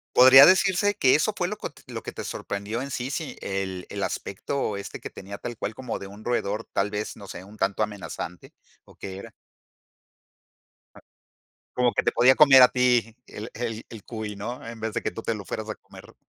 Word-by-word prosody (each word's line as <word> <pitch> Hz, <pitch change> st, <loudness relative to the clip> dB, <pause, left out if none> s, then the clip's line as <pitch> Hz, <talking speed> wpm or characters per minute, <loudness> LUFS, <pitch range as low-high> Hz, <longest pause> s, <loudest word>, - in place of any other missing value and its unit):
Podría 130 Hz, +2 st, +10 dB
decirse 190 Hz, +3 st, +4 dB
que 130 Hz, -10 st, +4 dB
eso 180 Hz, +8 st, +2 dB
fue 175 Hz, -3 st, -1 dB
lo 210 Hz, -, -5 dB
cot -, -, -8 dB
lo -, -, -6 dB
que -, -, -7 dB
te -, -, -6 dB
sorprendió 100 Hz, +4 st, -4 dB
en 140 Hz, -, -5 dB
sí, 130 Hz, +1 st, -3 dB
sí, 150 Hz, +1 st, -4 dB
el 95 Hz, -2 st, -3 dB
el -, -, -5 dB
aspecto, 105 Hz, +2 st, -3 dB
este, 100 Hz, -, -7 dB
que -, -, -6 dB
tenía 100 Hz, +1 st, -9 dB
tal 120 Hz, -2 st, -6 dB
cual 105 Hz, -, -4 dB
como 125 Hz, -1 st, -5 dB
de 100 Hz, -, -8 dB
un 100 Hz, +2 st, -12 dB
roedor, 110 Hz, -3 st, -1 dB
tal 100 Hz, +1 st, 0 dB
vez, 105 Hz, 0 st, -4 dB
no 100 Hz, -, -11 dB
sé, 95 Hz, -, -8 dB
un 105 Hz, +3 st, -14 dB
tanto 100 Hz, +2 st, 0 dB
amenazante, 100 Hz, -4 st, -6 dB, 0.3 s
¿o -, -, -18 dB
que 95 Hz, -1 st, -7 dB
era? 100 Hz, -, -10 dB, 2.4 s
Como 125 Hz, -1 st, +3 dB
que -, -, 0 dB
te -, -, +1 dB
podía 130 Hz, +2 st, +6 dB
comer 135 Hz, -3 st, +8 dB
a 125 Hz, -, +9 dB
ti 125 Hz, -2 st, +2 dB
el 110 Hz, +3 st, -8 dB
el 115 Hz, -2 st, -4 dB
el 110 Hz, -3 st, -10 dB
cuy, 110 Hz, -3 st, -6 dB
¿no? 120 Hz, +5 st, -6 dB
En 115 Hz, 0 st, -8 dB
vez 110 Hz, 0 st, -3 dB
de -, -, -2 dB
que -, -, -2 dB
tú -, -, -7 dB
te 115 Hz, -, -1 dB
lo 105 Hz, -, -7 dB
fueras 110 Hz, +2 st, -5 dB
a 110 Hz, -, -3 dB
comer. -, -, -16 dB
115 Hz, 215 wpm, -25 LUFS, 100-130 Hz, 2.4 s, Podría